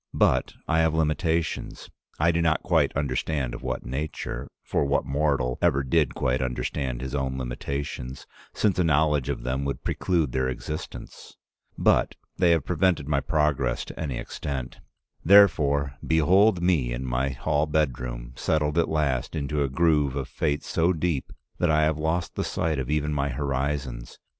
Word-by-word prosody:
But - - +2
I 80 -1 +2
have 80 -1 +2
limitations, 80 +1 -1 0.3
I 80 +3 +3
do 85 0 0
not 80 -1 +1
quite - - +2
understand 70 -1 -1
of - - -7
what - - -4
nature 65 -1 -4
— - - -63
for - - +2
what 70 0 +1
mortal 70 -3 0
ever 70 -6 +3
did 70 +1 +1
quite 65 +1 0
understand 65 0 -2
his 65 0 -5
own 65 -2 -1
limitations, 65 +1 -5 0.3
since 100 -4 +1
a - - +4
knowledge 75 -4 +2
of - - -3
them 65 +2 -1
would 70 - -3
preclude 85 -7 0
their 65 +1 0
existence? 75 +4 -7 0.2
— - - -45
but - - +3 0.2
they 90 -2 +3
have 80 -4 +3
prevented 90 -4 +1
my 75 -2 +2
progress 70 -3 0
to - - -10
any 70 -6 -3
extent. 65 -3 -5 0.4
Therefore 70 -8 +5
behold 90 +4 +4
me 80 -9 +2
in 60 +2 -3
my 65 +2 0
hall 75 +4 0
bedroom, 60 -5 -2
settled 75 0 0
at 85 - +1
last 70 -4 0
into 75 -1 -1
a 70 - +1
groove 75 -2 +2
of 70 -2 -3
fate 75 -2 -1
so 85 +2 +1
deep 80 -4 -2 0.3
that 90 - +2
I 75 0 +4
have 75 0 +1
lost 80 +3 -1
the - - -2
sight 80 -3 -1
of 65 0 -4
even 75 0 0
my 70 -1 0
horizons. 65 -2 -3
75 Hz, 170 wpm, -26 LUFS, 65-80 Hz, 0.4 s, Therefore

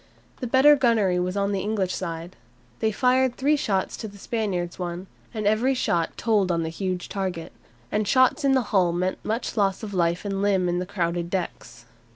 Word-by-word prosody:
The 250 - -3
better 265 +5 +6
gunnery 220 -9 +2
was 180 +2 -2
on 200 0 +1
the 195 - 0
English 200 -2 -1
side. 170 0 -5 0.4
They 220 -1 +1
fired 255 +2 +2
three 290 +3 +2
shots 195 -9 -1
to 220 - -5
the 200 -1 -12
Spaniards' 190 -6 -3
one, 175 +1 -4 0.3
and 215 -3 -4
every 225 +6 +2
shot 170 -9 0
told 210 -5 +2
on 170 -1 0
the 160 - -2
huge 180 +1 -3
target. 185 -4 -4 0.4
And 210 -1 0
shots 255 +4 +3
in 275 -1 +4
the 260 -2 +3
hull 180 -4 +3
meant 185 +2 -2
much 225 +3 -2
loss 195 -1 +1
of 205 -2 -6
life 170 +1 0
and 195 -1 -2
limb 195 -3 +2
in 175 0 0
the 180 - -4
crowded 170 -3 -2
decks. 185 -1 -5
195 Hz, 195 wpm, -25 LUFS, 180-225 Hz, 0.4 s, better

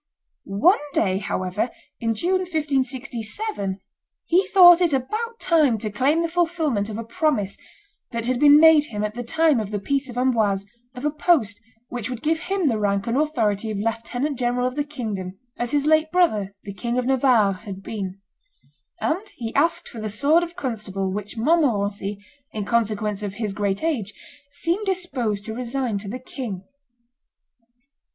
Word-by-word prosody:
One 210 - +3
day, 190 -2 +1
however, 185 +3 -2 0.3
in 225 -1 0
June, 365 - +1
1567, 275 - -2 0.5
he 370 +3 +3
thought 355 -2 +8
it 340 -4 +3
about 435 - -2
time 300 -9 +3
to 215 0 -4
claim 285 +10 +2
the - - +1
fulfilment 325 -11 0
of 215 - -5
a 230 - -4
promise 230 -4 0 0.5
that 230 -2 -3
had 250 0 0
been 290 +1 +8
made 320 -2 +7
him 210 -6 -4
at 210 0 -2
the 245 - -5
time 315 +2 +2
of 210 -2 -3
the 210 - -2
peace 275 +6 -1
of 245 - -8
Amboise 220 -6 +1 0.3
of 250 +3 -6
a 300 - +2
post 280 - +1 0.3
which 245 -1 -4
would 250 -2 -6
give 320 +1 +1
him 370 0 -1
the 225 -5 +1
rank 200 -1 0
and 230 - -1
authority 230 -8 0
of 215 - -3
lieutenant 235 +6 -2
general 245 0 0
of 255 - -3
the 290 - 0
kingdom, 215 -10 -5 0.2
as 240 - -1
his 290 +1 +1
late 315 0 +3
brother, 215 - +2
the 200 - -7
King 235 +6 -3
of 250 - 0
Navarre, 250 -6 +3
had 195 0 -9
been; 195 -3 -5 0.8
and 380 +7 -1
he 230 -2 -5
asked 335 - +1
for 225 - -8
the 215 - -3
sword 285 +11 +3
of 345 0 -5
constable 210 - -3
which 210 +4 -5
Montmorency, 210 - +1 0.4
in 210 -2 -3
consequence 215 -2 0
of 200 -2 -4
his 210 -2 -2
great 200 +1 -1
age, 235 -12 -1 0.4
seemed 345 +8 -2
disposed 255 - -1
to 220 - -5
resign 245 -2 -2
to 200 0 -6
the 245 - -4
king. 240 -7 -6
245 Hz, 175 wpm, -23 LUFS, 210-305 Hz, 0.8 s, thought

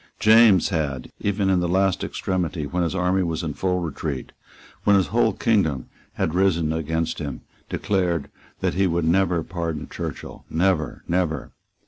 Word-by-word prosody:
James 110 -4 +6
had, 75 -8 -2
even 100 -1 0
in 95 -1 +3
the 90 - 0
last 95 +1 +1
extremity, 85 -5 -2
when 90 +5 -2
his 85 +1 -1
army 90 +1 +2
was 85 -2 -2
in 80 -3 -3
full 90 +3 -1
retreat, 80 -4 -4 0.5
when 105 - +5
his 95 -6 +2
whole - - +4
kingdom 80 - +1 0.2
had 80 - -1
risen 85 -4 +2
against 80 +1 -2
him, 70 -5 -5 0.3
declared 90 -6 0 0.3
that - - +1
he 95 +1 +2
would 85 -1 0
never 90 -1 +2
pardon 85 -3 -4
Churchill, - - -7
never, 85 -2 0
never. 85 -5 -1
85 Hz, 155 wpm, -23 LUFS, 80-95 Hz, 0.5 s, James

